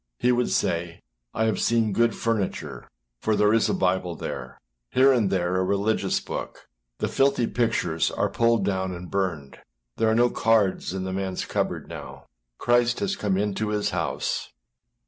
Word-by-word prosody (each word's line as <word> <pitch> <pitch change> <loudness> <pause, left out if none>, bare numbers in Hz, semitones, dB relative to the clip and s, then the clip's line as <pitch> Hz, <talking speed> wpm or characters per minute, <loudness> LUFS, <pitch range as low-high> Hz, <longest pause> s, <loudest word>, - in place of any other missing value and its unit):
â - - -54 0.2
he 125 - +5
would 125 0 +1
say, 85 -1 -1 0.4
âI 110 - +1
have 110 - 0
seen 115 -3 +2
good 115 +2 +2
furniture, 115 -4 -3 0.3
for 110 +8 +1
there 105 +1 +3
is 115 - +3
a - - +1
Bible 90 -2 0
there; - - -6 0.3
here 135 +1 +5
and 115 -6 +2
there 90 -1 0
a 95 - +2
religious 100 +3 +1
book; - - -7 0.3
the - - -1
filthy 135 -3 +2
pictures 85 -10 0
are - - 0
pulled 115 -3 +2
down 95 -2 -1
and 90 0 -9
burned; 85 -8 -2 0.4
there 110 - +2
are 110 - +2
no 120 +1 +4
cards 110 -6 +2
in 95 0 -3
the 95 - -3
manâs 95 -1 -3
cupboard - - -2
now; - - -9 0.3
Christ 120 0 +2
has 200 -1 -1
come 100 - 0
into 105 +1 -1
his 105 -1 0
house. - - -2
105 Hz, 175 wpm, -25 LUFS, 95-115 Hz, 0.4 s, he